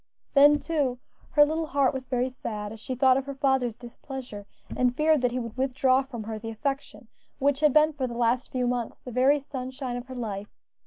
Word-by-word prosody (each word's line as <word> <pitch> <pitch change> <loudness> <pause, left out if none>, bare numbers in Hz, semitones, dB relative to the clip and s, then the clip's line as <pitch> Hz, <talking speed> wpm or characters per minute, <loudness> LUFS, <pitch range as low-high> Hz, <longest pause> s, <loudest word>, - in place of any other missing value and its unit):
Then, 290 +1 +7
too, 285 -4 -1 0.4
her 295 -1 +7
little 315 +1 -2
heart 280 -3 +2
was 260 -1 -5
very 250 0 +1
sad 210 -4 -5
as 225 - -9
she 255 +4 -5
thought 255 +1 +4
of 270 0 -3
her 280 - -5
father's 265 -4 +1
displeasure, 240 -4 -9 0.3
and 250 -1 +2
feared 310 -2 +3
that 250 - +2
he 245 - -4
would 230 -3 -5
withdraw 260 0 +2
from 255 -5 -7
her 220 0 -5
the 225 +1 -6
affection 270 +2 -4 0.3
which 280 0 +1
had 300 -1 +4
been 305 +2 +4
for 265 -3 -2
the 235 -1 -6
last 240 +2 +1
few 255 -1 0
months 245 -2 -2
the 250 - -9
very 260 +4 +4
sunshine 260 -2 -5
of 245 +1 -8
her 260 - -8
life. 210 -4 -5
255 Hz, 215 wpm, -27 LUFS, 240-280 Hz, 0.4 s, Then